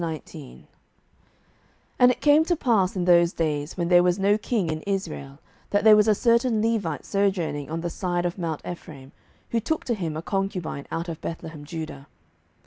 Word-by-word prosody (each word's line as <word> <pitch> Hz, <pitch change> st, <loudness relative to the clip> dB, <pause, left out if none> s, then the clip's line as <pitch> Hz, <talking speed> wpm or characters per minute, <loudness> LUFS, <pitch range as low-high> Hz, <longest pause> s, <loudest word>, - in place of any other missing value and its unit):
07:019:001 155 Hz, -, -7 dB, 1.4 s
And 250 Hz, -, +7 dB
it 250 Hz, -, -1 dB
came 295 Hz, +1 st, +5 dB
to 345 Hz, -, +1 dB
pass 220 Hz, -, +1 dB
in 180 Hz, -2 st, -1 dB
those 175 Hz, -1 st, +5 dB
days, 150 Hz, 0 st, -2 dB
when 170 Hz, -1 st, -1 dB
there 175 Hz, -1 st, +7 dB
was 180 Hz, 0 st, +2 dB
no 200 Hz, +1 st, +3 dB
king 210 Hz, -5 st, -1 dB
in 155 Hz, 0 st, -4 dB
Israel, 165 Hz, -8 st, -4 dB, 0.3 s
that 205 Hz, -, +1 dB
there 220 Hz, -1 st, +8 dB
was 210 Hz, +1 st, +4 dB
a 215 Hz, -, +4 dB
certain 235 Hz, 0 st, +2 dB
Levite 210 Hz, -9 st, -1 dB
sojourning 185 Hz, -8 st, -1 dB
on 165 Hz, +1 st, -3 dB
the 175 Hz, -, -3 dB
side 175 Hz, -1 st, -2 dB
of 175 Hz, +2 st, -3 dB
mount 165 Hz, -3 st, -3 dB
Ephraim, 150 Hz, -6 st, -9 dB, 0.4 s
who 230 Hz, -, +2 dB
took 315 Hz, +8 st, -2 dB
to 240 Hz, -, 0 dB
him 165 Hz, -8 st, -3 dB
a 160 Hz, -, -5 dB
concubine 185 Hz, -7 st, -3 dB
out 165 Hz, +2 st, -3 dB
of 165 Hz, -2 st, -6 dB
Bethlehemjudah. 160 Hz, -2 st, -7 dB
175 Hz, 180 wpm, -25 LUFS, 160-210 Hz, 1.4 s, there